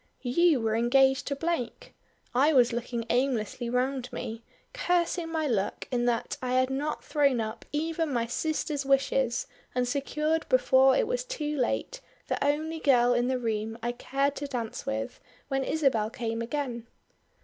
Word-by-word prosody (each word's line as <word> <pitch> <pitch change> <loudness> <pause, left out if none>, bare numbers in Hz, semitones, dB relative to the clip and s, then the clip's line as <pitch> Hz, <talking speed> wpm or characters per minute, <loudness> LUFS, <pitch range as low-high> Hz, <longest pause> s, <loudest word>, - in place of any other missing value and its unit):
You 305 +4 +3
were 220 -1 +1
engaged 265 +3 +3
to 280 - -1
Blake. 325 -5 -3 0.4
I 280 +6 +4
was 245 -3 +5
looking 235 0 -3
aimlessly 245 -2 0
round 250 +1 -1
me, 225 +1 -5 0.3
cursing 350 -6 0
my 320 -1 0
luck 215 -8 -1
in 240 -1 +1
that 240 -2 0
I 250 0 -2
had 255 +1 +2
not 290 +3 -2
thrown 280 -5 +2
up 220 0 -4
even 320 +1 -1
my 235 -3 0
sister's 300 +3 -2
wishes 270 -3 +1 0.3
and 250 0 +1
secured 305 +4 -1
before 265 - +5
it - - +2
was - - -1
too 305 -12 -3
late 300 - -1 0.3
the - - 0
only 310 +3 0
girl 245 -4 +4
in 240 0 +1
the 260 0 +1
room 225 -2 -2
I 240 - 0
cared 275 +3 -1
to 285 - -4
dance 240 -5 -4
with 110 +1 -3 0.3
when 270 -1 0
Isabel 265 -9 +1
came 230 -1 -3
again. 240 -2 -3
265 Hz, 160 wpm, -28 LUFS, 240-295 Hz, 0.4 s, was